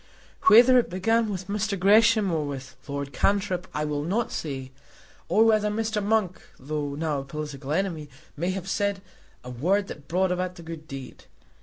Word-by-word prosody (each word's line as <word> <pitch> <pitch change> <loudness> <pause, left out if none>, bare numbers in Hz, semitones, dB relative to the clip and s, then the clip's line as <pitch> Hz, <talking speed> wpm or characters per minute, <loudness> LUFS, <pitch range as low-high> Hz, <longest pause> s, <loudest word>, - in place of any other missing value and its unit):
Whether 240 +4 +8
it 240 - -1
began 225 +5 +1
with 185 -2 -5
Mr. 205 0 -1
Gresham 215 +1 +5
or 160 -2 0
with 135 -2 -6
Lord 140 -1 -4
Cantrip, 190 -2 0
I 150 +1 -2
will 150 -1 -2
not 210 +9 -1
say; 135 -4 -5 0.6
or 220 - +5
whether 215 -2 +3
Mr. 215 0 -1
Monk, 205 -3 0 0.2
though 145 +1 -3
now 150 -1 -1
a - - -5
political 145 -1 -6
enemy, 165 -3 -1 0.3
may 175 +5 -2
have 190 -1 -4
said 200 0 -1 0.4
a 125 - -8
word 185 +12 +1
that 145 - -9
brought 185 +2 +1
about 180 0 -2
the 170 - -11
good 160 -1 -8
deed. 135 -2 -9
180 Hz, 175 wpm, -26 LUFS, 150-205 Hz, 0.6 s, Whether